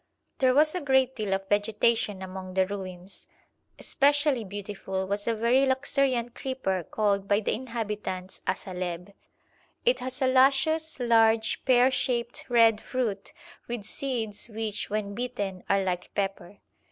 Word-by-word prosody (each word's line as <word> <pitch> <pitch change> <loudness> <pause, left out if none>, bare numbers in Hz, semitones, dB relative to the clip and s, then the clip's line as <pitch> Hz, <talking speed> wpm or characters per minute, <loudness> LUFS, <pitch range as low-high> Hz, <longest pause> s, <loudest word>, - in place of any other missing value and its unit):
There 255 -1 +4
was 305 +2 +5
a 360 - -2
great 265 -2 +2
deal 215 -4 -3
of 195 0 -6
vegetation 210 -1 +1
among 185 0 -7
the 190 0 +4
ruins. 185 -1 -7 0.5
Specially 290 -3 +2
beautiful 195 -1 -4
was 200 +2 -3
a 230 - +1
very 235 +4 +3
luxuriant 260 -2 +1
creeper 260 -9 -2
called 200 +1 0
by 205 +1 +3
the 215 - -1
inhabitants 210 -6 -5
asaleb. 180 0 -4 0.7
It - - +3
has 255 0 -3
a - - +4
luscious, 275 +5 +3
large, 225 -2 +3
pear 255 0 +5
shaped 245 -2 -2
red 230 -3 +5
fruit 220 -6 -3 0.4
with 240 -3 -4
seeds 235 -3 -4
which, 220 -1 -4
when 205 -1 -2
bitten, 205 -5 -4
are 195 0 +3
like 180 -1 -3
pepper. 195 -1 -3
220 Hz, 140 wpm, -27 LUFS, 195-255 Hz, 0.7 s, was